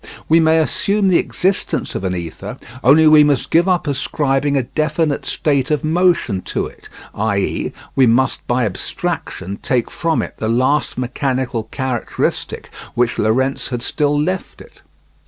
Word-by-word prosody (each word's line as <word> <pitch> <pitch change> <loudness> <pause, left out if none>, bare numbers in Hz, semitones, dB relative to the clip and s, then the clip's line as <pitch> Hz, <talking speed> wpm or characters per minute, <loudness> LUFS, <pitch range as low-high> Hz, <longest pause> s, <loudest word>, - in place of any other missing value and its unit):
We 165 +1 +5
may 160 0 +4
assume 190 +5 +1
the 180 - +4
existence 180 - -1
of - - -4
an 90 -1 -1
ether; 85 -2 -6 0.3
only 150 +5 +6
we 155 -1 +7
must 145 -2 +1
give 170 +3 +4
up 180 -3 +1
ascribing 140 0 0
a 130 - +1
definite 155 +2 -1
state 140 -3 0
of 150 -2 0
motion 160 - +2
to - - -3
it, - - -13 0.2
i.e. 100 -2 -1 0.2
we 130 -2 +5
must 120 +3 +1
by 120 0 +1
abstraction 100 0 -4
take 125 -4 0
from 165 -1 0
it - - -8
the 110 - -2
last 130 +5 +1
mechanical 125 -2 -2
characteristic 130 0 -3 0.2
which 120 -1 +1
Lorentz 130 +5 +1
had 120 -2 -3
still 145 0 0
left 185 +5 -2
it. - - -16
135 Hz, 155 wpm, -18 LUFS, 120-160 Hz, 0.3 s, we